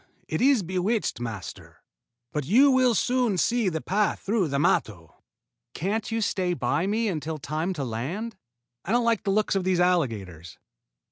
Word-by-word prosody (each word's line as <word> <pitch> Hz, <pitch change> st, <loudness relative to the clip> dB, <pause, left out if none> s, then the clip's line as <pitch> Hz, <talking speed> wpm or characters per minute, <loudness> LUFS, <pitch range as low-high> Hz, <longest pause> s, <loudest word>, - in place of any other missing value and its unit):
It -, -, -2 dB
is 260 Hz, -5 st, +4 dB
bewitched, 185 Hz, -, -1 dB
master. 115 Hz, -6 st, -8 dB, 0.5 s
But 150 Hz, -, -2 dB
you 250 Hz, -, +5 dB
will 255 Hz, -2 st, +3 dB
soon 245 Hz, -3 st, +1 dB
see 235 Hz, 0 st, +2 dB
the 160 Hz, -2 st, -3 dB
path 205 Hz, +3 st, 0 dB
through 200 Hz, -3 st, 0 dB
the 140 Hz, -1 st, -1 dB
matto." 140 Hz, -, 0 dB, 0.6 s
"Can't 205 Hz, +5 st, -2 dB
you 225 Hz, 0 st, -1 dB
stay 185 Hz, -4 st, 0 dB
by 160 Hz, +3 st, 0 dB
me 220 Hz, +3 st, 0 dB
until 160 Hz, -4 st, -3 dB
time 155 Hz, +5 st, -3 dB
to 145 Hz, -6 st, -4 dB
land? 145 Hz, -, -4 dB, 0.5 s
I 195 Hz, -, -2 dB
don't 240 Hz, 0 st, +2 dB
like 230 Hz, -2 st, +2 dB
the -, -, 0 dB
looks 210 Hz, +2 st, +1 dB
of 195 Hz, -2 st, 0 dB
these 185 Hz, -1 st, +1 dB
alligators." 110 Hz, -, -1 dB
185 Hz, 165 wpm, -26 LUFS, 150-225 Hz, 0.6 s, you